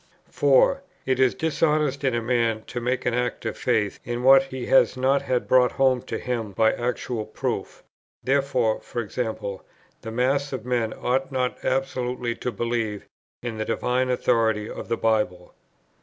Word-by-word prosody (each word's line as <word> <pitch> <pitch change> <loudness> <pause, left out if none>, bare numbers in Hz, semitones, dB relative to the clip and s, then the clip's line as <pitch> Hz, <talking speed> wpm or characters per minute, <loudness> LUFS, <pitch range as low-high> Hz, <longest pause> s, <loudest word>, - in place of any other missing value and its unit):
4. 145 - +4 0.2
It 130 -1 0
is 130 -1 +4
dishonest 155 -5 +1
in 130 -3 +1
a 115 - -1
man 115 -2 +1
to 120 - -6
make 125 +2 -1
an 125 - +1
act 125 0 -2
of - - -2
faith 110 -5 0
in 120 +1 -4
what 135 +1 +7
he 130 -2 -6
has 135 -1 +4
not 135 +2 +2
had 125 -1 -1
brought 125 -1 +4
home 130 -2 +3
to 130 - -5
him 115 -5 -3
by 110 +3 +3
actual 120 -1 -2
proof. - - -4 0.4
Therefore, 130 -5 +1 0.2
e.g. 115 +1 -2 0.8
the 115 - -6
mass 135 +4 0
of 125 -3 -5
men 120 -3 0
ought 130 +4 -1
not 125 -1 -2
absolutely 125 -2 -1
to 125 - -3
believe 115 -1 -2 0.4
in 115 -3 -4
the - - 0
divine 125 +2 0
authority 115 -4 +1
of - - -7
the 115 - -1
Bible. 105 -6 0
125 Hz, 165 wpm, -24 LUFS, 115-130 Hz, 0.8 s, what